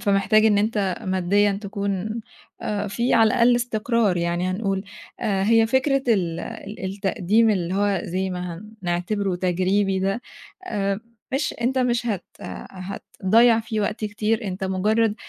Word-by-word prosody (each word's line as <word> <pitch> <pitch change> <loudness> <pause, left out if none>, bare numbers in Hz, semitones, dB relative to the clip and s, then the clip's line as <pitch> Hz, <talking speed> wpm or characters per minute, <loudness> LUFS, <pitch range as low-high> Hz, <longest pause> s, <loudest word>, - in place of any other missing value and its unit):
فمحتاج 200 +2 +3
إن 205 -2 +4
أنت 205 -3 0
ماديًا 190 +2 +2
تكون 200 +2 -3 0.4
آآ، 205 0 -2
في 235 +5 +1
على 225 -1 +6
الأقل 240 +2 +4
استقرار 230 -4 +1
يعني 175 +1 0
هنقول 195 0 -1 0.4
آآ، 195 -2 0
هي 225 +1 +5
فكرة 265 +3 +2
ال 175 -7 +1
ال 205 +1 -7
التقديم 200 +3 +2
اللي 185 -3 -1
هو 200 -1 +1
زَي 190 +2 -2
ما 180 -1 -5 0.2
هنعتبرُه 180 +2 -1
تجريبي 190 +2 +1
ده 195 +5 0 0.5
آآ، 200 - -1 0.3
مش 285 +3 0
أنت 260 +3 +1
مش 240 -1 +1
هت 205 -6 -2 0.2
هتضيّع 195 - +1
فيه 220 -1 -3
وقت 215 +2 -2
كتير 215 +2 -1
أنت 190 0 -3
مجرّد 210 +4 +1
205 Hz, 140 wpm, -23 LUFS, 190-225 Hz, 0.5 s, على